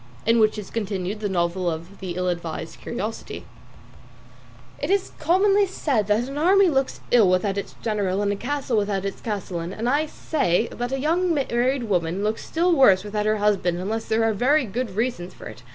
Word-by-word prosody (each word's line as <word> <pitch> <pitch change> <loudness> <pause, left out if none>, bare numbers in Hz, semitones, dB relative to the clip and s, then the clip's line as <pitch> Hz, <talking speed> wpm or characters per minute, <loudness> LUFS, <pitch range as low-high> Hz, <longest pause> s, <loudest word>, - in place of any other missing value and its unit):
IN 230 +1 +4
WHICH 215 0 +3
IS 210 -2 -7
CONTINUED 205 -2 -3
THE 210 -1 -2
NOVEL 175 0 0
OF 170 +4 -7
"THE 185 -3 -5
ILL 180 0 0
ADVISED 165 -2 -5
CURIOSITY" 225 -2 -5 1.3
"It - - -3
is 395 0 +1
commonly 390 +5 +3
said 270 - -1
that 215 +4 +1
an 275 +2 -5
army 380 +3 +5
looks 270 -3 -1
ill 225 -6 +6
without 185 +2 +1
its 200 - -5
general 205 -3 0
and 205 - +1
a - - -1
castle 260 +1 -2
without 200 -2 0
its 195 - -5
castellan, 185 -5 -4
and 225 +4 -3
I 290 +5 +2
say 230 - 0
that 245 +1 -4
a 270 - -1
young 335 +4 +1
married 260 -1 0
woman 180 -3 -1
looks 215 +1 -1
still 345 +2 +1
worse 200 -10 +5
without 210 0 -2
her 215 0 +2
husband 200 -4 +1
unless 215 +5 -3
there 220 +1 +1
are 225 -1 +2
very 265 +7 +3
good 225 -1 -4
reasons 220 -6 -2
for - - -12
it. - - -9
215 Hz, 195 wpm, -24 LUFS, 190-265 Hz, 1.3 s, ill